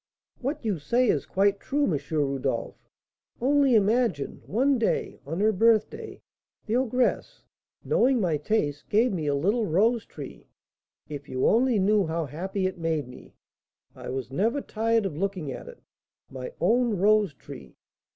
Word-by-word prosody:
"What 275 +1 -4
you 200 -7 0
say 240 - +1
is - - 0
quite 200 +1 +2
true, 290 +1 -1
M. 160 - +1
Rodolph. 140 -4 -2 0.5
Only 275 0 +3
imagine, 215 - +1
one 260 +5 +2
day, 225 - -1
on 165 +5 -3
her 215 +1 +4
birthday, 220 +1 +1 0.4
the 220 - -1
ogress, 255 - 0 0.4
knowing 255 0 +2
my 170 -7 +1
taste, 145 -7 -1
gave 225 +2 +3
me 160 -5 -2
a 145 - +1
little 205 +10 +1
rose 220 +7 +2
tree. - - -10 0.6
If 145 -2 -8
you 130 0 -1
only 245 0 +3
knew 200 -1 +3
how 165 0 -2
happy 185 +7 -3
it 185 -1 -3
made 160 -5 -1
me, 125 - -14 0.6
I - - -8
was 130 -1 -4
never 220 - +1
tired 225 -3 0
of 180 -6 -3
looking 185 -6 -2
at - - -8
it, 485 -1 -13 0.5
my - - -6
own 240 -3 +2
rose 205 -4 +3
tree! 70 - -12
205 Hz, 155 wpm, -26 LUFS, 160-235 Hz, 0.6 s, her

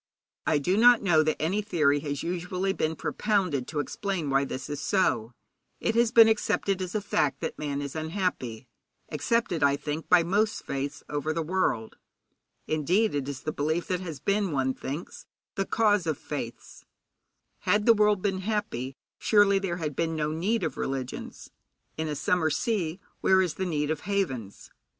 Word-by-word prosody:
'I 155 - +4
do 180 +7 +1
not 240 0 +6
know 165 -5 +5
that 155 0 0
any 185 +7 0
theory 155 -8 +2
has 145 -1 -4
usually 180 +2 -2
been 160 -3 -1
propounded 180 - 0
to 155 - -3
explain 170 -1 -2
why 135 +1 +3
this 130 0 -5
is 145 -1 -4
so. 120 - +1 0.5
It 225 - 0
has 230 0 +3
been 230 -2 +8
accepted 200 -3 +1
as 180 +1 -4
a 210 - +1
fact 150 -8 0
that - - -4
man 145 -1 -2
is 140 +1 -6
unhappy, 155 - -3 0.4
accepted, 180 +1 0
I 140 -1 +4
think, 150 +2 -5
by 180 -2 +6
most 210 +5 0
faiths 140 +1 -4
over 150 +1 -2
the 165 0 -1
world. 155 -10 -1 0.7
Indeed, 175 +8 +1
it 145 -1 -2
is 140 -1 -5
the 155 - -3
belief 155 +4 -1
that 180 -1 0
has 165 -6 -6
been, 200 -2 0
one 130 -2 +1
thinks, 145 +7 -7 0.3
the 195 - -1
cause 205 -6 +2
of 155 - 0
faiths. 130 -6 -7 0.8
Had 210 0 +1
the 230 - +8
world 210 -3 +3
been 195 -2 0
happy, 190 - -2 0.2
surely 205 -2 +4
there 185 -3 -2
had 155 -4 -3
been 165 -1 -1
no 150 -1 -1
need 185 +7 0
of 160 - -2
religions. 135 -1 -5 0.4
In 160 0 -2
a 150 - -2
summer 160 +3 +1
sea, 180 0 -1 0.2
where 190 0 +4
is 180 -4 +1
the 190 - -3
need 150 -3 0
of 155 - -1
havens? 155 - -3
165 Hz, 180 wpm, -27 LUFS, 145-200 Hz, 0.8 s, been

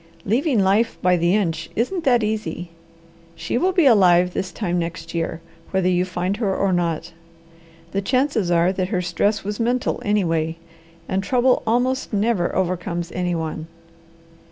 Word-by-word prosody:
Leaving 250 - +1
life 200 +4 +2
by 180 0 +4
the 175 +2 +2
inch 165 -6 -1
isn't 330 - -1
that 245 -4 +4
easy. 180 -6 -3 0.6
She - - -4
will 370 +6 +2
be 355 -4 +3
alive 180 -7 +5
this 185 - -3
time 180 -5 -2
next 165 -1 -5
year, 165 -1 -3 0.3
whether 190 -1 +1
you 180 0 +2
find 180 +2 -2
her 200 -5 0
or 195 -1 +1
not. 170 -1 -1 0.8
The 195 - -1
chances 255 -3 +1
are 175 +2 +3
that 185 -1 -2
her 180 -4 -1
stress 200 +5 0
was 205 +2 -4
mental 245 +2 0
anyway, 165 -6 0 0.5
and 190 +1 0
trouble 250 +4 +2
almost 250 +2 0
never 205 -3 0
overcomes 180 -1 -2
any 180 -1 -1
one." 160 -1 -4
190 Hz, 155 wpm, -22 LUFS, 175-220 Hz, 0.8 s, alive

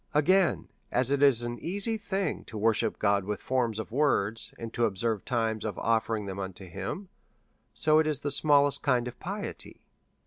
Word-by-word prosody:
Again, 185 +5 +3 0.2
as 125 +1 +1
it 140 0 +1
is 135 -5 +5
an 120 0 -4
easy 200 +6 -2
thing 200 -2 -2
to 110 - -8
worship 110 +1 +2
God 100 -1 +2
with 105 +2 -3
forms 120 -4 0
of 110 - -5
words, 115 -6 +1
and 115 -1 -7
to 120 - +2
observe 110 0 -1
times 115 -3 -1
of 110 - -4
offering 115 -2 0
them 95 0 -5
unto 95 0 -6
him, 100 - -5 0.7
so 155 0 +4
it 160 - +2
is 150 -3 -1
the 145 - -1
smallest 145 -1 +4
kind 125 -3 +1
of 125 - -8
piety. 200 +4 -5
120 Hz, 180 wpm, -29 LUFS, 110-150 Hz, 0.7 s, is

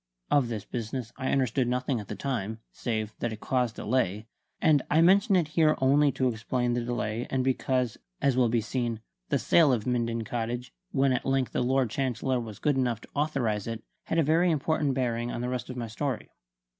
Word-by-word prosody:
Of 140 -4 +4
this 110 -3 -4
business 120 0 -4
I 130 0 -1
understood 130 -1 +1
nothing 125 0 0
at 105 - -8
the - - -5
time, 110 -6 -3
save 110 -2 -3
that 120 - -1
it 110 - -6
caused 125 -2 0
delay; 105 -3 0 0.3
and 150 -3 +4
I 155 - +4
mention 195 +5 +5
it 170 -5 +2
here 155 -1 +3
only 140 +2 +4
to 130 - +1
explain 120 +1 -1
the 120 - 0
delay 120 -1 -2
and 130 -1 0
because 130 -2 0 0.2
(as 135 -3 +2
will 125 -2 +3
be 115 0 +2
seen) 115 0 -2 0.3
the - - +2
sale 160 -5 +4
of 115 -4 0
Minden 115 -2 0
Cottage, 120 +2 -4 0.2
when 135 -1 +3
at 125 - -1
length 135 -1 0
the - - 0
Lord 130 -2 +1
Chancellor 130 0 0
was 110 -4 -7
good 145 -2 +1
enough 120 -4 0
to - - -15
authorize 130 -9 0
it, 115 -1 -5 0.2
had 165 - -1
a 165 - +5
very 165 +4 +3
important 150 -3 +1
bearing 120 -2 -1
on - - -4
the 125 - -2
rest 125 -1 -3
of 125 - -6
my 120 - -2
story. 130 +5 -3
125 Hz, 205 wpm, -28 LUFS, 115-135 Hz, 0.3 s, mention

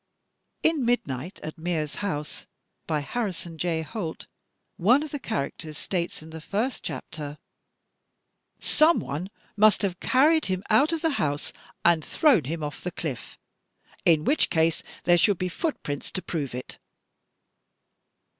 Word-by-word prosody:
In 320 -4 +3
"Midnight 180 - -1
at 155 +1 -6
Mears 160 -3 -2
House," 150 -7 -4 0.4
by 155 -2 0
Harrison 175 -2 -4
J. 165 -2 0
Holt, 165 -1 -5 0.5
one 245 - +5
of 310 - -6
the 290 - -3
characters 155 - -4
states 175 -4 -2
in 160 - -11
the 160 0 -7
first 220 - -2
chapter, 145 0 -6 1.2
"some 315 +3 +4
one 145 +8 -4 0.3
must 215 0 +5
have 185 -2 -1
carried 305 +5 +4
him 185 0 -1
out 280 +9 +5
of 330 -1 -2
the 325 - +3
house 145 -1 -1 0.3
and 170 -2 +5
thrown 275 - +4
him 160 +3 -3
over 145 -1 -5
the 180 - -2
cliff; 150 -8 -5 0.7
in 160 -3 +5
which 295 - +3
case 160 -1 +2 0.2
there 175 0 +5
should 200 +2 +4
be 185 +1 -1
footprints 180 - -3
to 185 - -2
prove 145 -7 -3
it." 125 - -7
175 Hz, 145 wpm, -26 LUFS, 155-225 Hz, 1.2 s, one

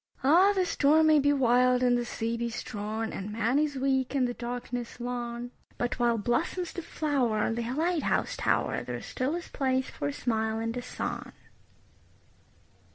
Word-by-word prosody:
Ah, 350 +9 +6
the 375 -1 +2
storm 315 -1 +4
may 310 -1 +6
be 285 +1 +3
wild 250 -2 +3
and 245 -1 +4
the 240 0 0
sea 230 -1 -2
be 235 0 -2
strong, 220 -1 -4
And 195 +2 -5
man 230 +5 +1
is 300 -2 0
weak 265 0 0
and 260 -2 +3
the 245 - -3
darkness 245 0 -5
long, 240 0 -4 0.3
But 245 +1 -2
while 235 -1 +3
blossoms 305 - -1
the 350 - -4
flower 280 -9 0
on 220 - +1
the 235 0 -3
light 325 +4 0
house - - 0
tower - - 0
There - - -5
still 270 +5 -2
is 345 - -6
place 260 -1 0
for 145 - -3
a - - -1
smile 220 - -1
and 230 +1 -2
a 250 - -3
song. 250 - -5
245 Hz, 180 wpm, -29 LUFS, 235-280 Hz, 0.3 s, Ah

